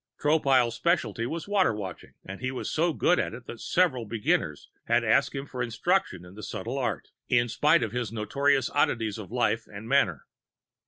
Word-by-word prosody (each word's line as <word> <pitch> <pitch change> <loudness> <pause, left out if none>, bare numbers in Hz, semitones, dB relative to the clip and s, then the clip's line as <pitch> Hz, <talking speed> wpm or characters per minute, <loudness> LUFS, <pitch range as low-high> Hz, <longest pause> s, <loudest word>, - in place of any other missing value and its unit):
Tropile's 135 -6 +3
specialty 120 - 0
was 165 +6 -5
Water 195 - +2
Watching 95 -4 -8
and 95 +4 -8
he 130 - -1
was 130 - -4
so 170 +2 +2
good 180 +3 +2
at - - -2
it 120 0 -11
that 115 - -9
several 135 - +1
beginners 110 -1 -1 0.2
had - - +2
asked - - +2
him 135 0 -4
for 130 -3 -6
instruction 115 - 0
in 90 - -13
the 105 - -10
subtle 120 +6 -4
art, 125 - -2 0.2
in 120 -1 +3
spite 150 +8 +3
of 110 - -3
his 120 -2 -3
notorious 135 +5 +1
oddities 110 -2 0
of 105 -2 -9
life 120 -2 0
and 105 +2 -8
manner. 100 - +2
120 Hz, 190 wpm, -27 LUFS, 110-140 Hz, 0.2 s, Tropile's